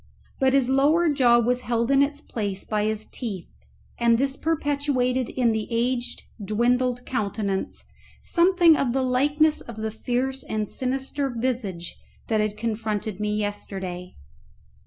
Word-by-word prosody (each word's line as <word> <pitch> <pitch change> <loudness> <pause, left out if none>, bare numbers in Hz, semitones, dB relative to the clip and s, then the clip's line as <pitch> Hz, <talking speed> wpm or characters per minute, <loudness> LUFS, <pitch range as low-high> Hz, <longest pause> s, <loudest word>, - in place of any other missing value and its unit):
But 265 0 +3
his 270 -3 +3
lower 295 +6 +3
jaw 250 -5 +4
was 245 +1 +1
held 235 +1 0
in 275 0 +5
its 285 +1 0
place 205 -8 -4
by 210 -1 -1
his 215 0 -2
teeth, 195 - -7 0.4
and 235 -1 +4
this 270 +2 0
perpetuated 280 -5 0
in 245 -3 +1
the 220 -1 -2
aged 240 +1 -1 0.2
dwindled 245 +4 +1
countenance 205 -4 -2 0.3
something 345 -2 +4
of 260 -5 0
the 265 0 +1
likeness 290 +5 +2
of 235 -2 -10
the 220 0 -3
fierce 255 +4 -2
and 215 -1 -2
sinister 270 +3 -2
visage 230 -8 -3 0.3
that 220 -2 +2
had 210 0 -2
confronted 215 -2 -3
me 210 0 -1
yesterday. 190 -3 -4
240 Hz, 140 wpm, -25 LUFS, 215-270 Hz, 0.4 s, in